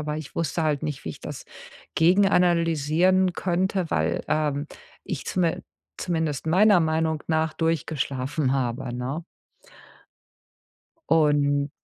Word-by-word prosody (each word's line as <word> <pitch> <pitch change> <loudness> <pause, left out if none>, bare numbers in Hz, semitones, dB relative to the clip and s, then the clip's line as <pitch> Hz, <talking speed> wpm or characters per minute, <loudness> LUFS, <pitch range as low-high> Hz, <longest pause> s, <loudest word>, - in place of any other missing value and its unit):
Aber 150 0 -3
ich 155 -3 -8
wusste 165 0 -1
halt 150 -2 0
nicht, 150 -3 -4
wie 80 - -3
ich - - -11
das - - -7 0.5
gegenanalysieren 175 -1 +3
könnte, 185 0 -1
weil, 80 +2 0
ähm, 150 -1 0 0.4
ich 165 - -5
zumin 175 -3 0 0.3
zumindest 160 -5 -2
meiner 195 +2 +5
Meinung 160 -1 0
nach 160 -1 +1
durchgeschlafen 145 -4 -1
habe, 125 -2 -2
ne? 130 +7 -4 1.9
Und 145 -2 +3
160 Hz, 110 wpm, -25 LUFS, 145-170 Hz, 1.9 s, meiner